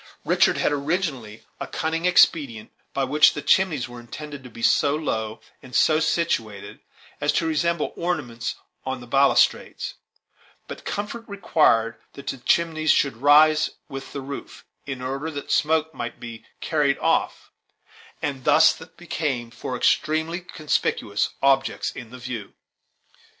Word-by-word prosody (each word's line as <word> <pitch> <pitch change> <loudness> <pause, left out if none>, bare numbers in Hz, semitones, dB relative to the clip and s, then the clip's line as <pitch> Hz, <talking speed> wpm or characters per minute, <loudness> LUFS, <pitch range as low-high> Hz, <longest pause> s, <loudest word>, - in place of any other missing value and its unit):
Richard - - +3
had - - +1
originally 140 - -2 0.2
a - - -4
cunning 165 +2 -2
expedient, 140 -10 +3 0.2
by 135 - -1
which 150 +4 +5
the 150 - -5
chimneys 160 -7 +2
were 120 0 -10
intended 145 +4 -9
to 125 - -10
be 115 0 -10
so 145 +4 +3
low, 110 -8 -3 0.2
and 125 -2 -10
so 155 +6 +4
situated, 160 - -1 0.4
as 145 - +2
to 165 - +1
resemble 165 +1 0
ornaments 130 -10 -3 0.3
on 130 0 -3
the 120 - -10
balustrades; 135 +3 +2 0.7
but - - -9
comfort 210 +3 -4
required 135 - +2 0.2
that 140 - -11
the 135 - -4
chimneys 160 +3 +1
should 140 -6 +3
rise 155 +3 +5 0.2
with 135 0 -7
the 140 - -5
roof, 140 +1 -8 0.2
in 130 -2 -5
order 135 +5 -3
that 145 -3 -6
the - - +1
smoke 160 +1 +2
might 120 0 -6
be 115 -1 -9 0.2
carried 145 -3 +1
off, - - 0 0.7
and 140 -3 -2
they - - -19
thus 150 +2 +6 0.2
became 145 -8 -3
four 125 +1 -5
extremely 160 +6 +1
conspicuous 150 - -1
objects 135 0 +2
in 120 -3 -9
the 125 - -10
view. 120 -5 -7
140 Hz, 145 wpm, -24 LUFS, 120-160 Hz, 0.7 s, thus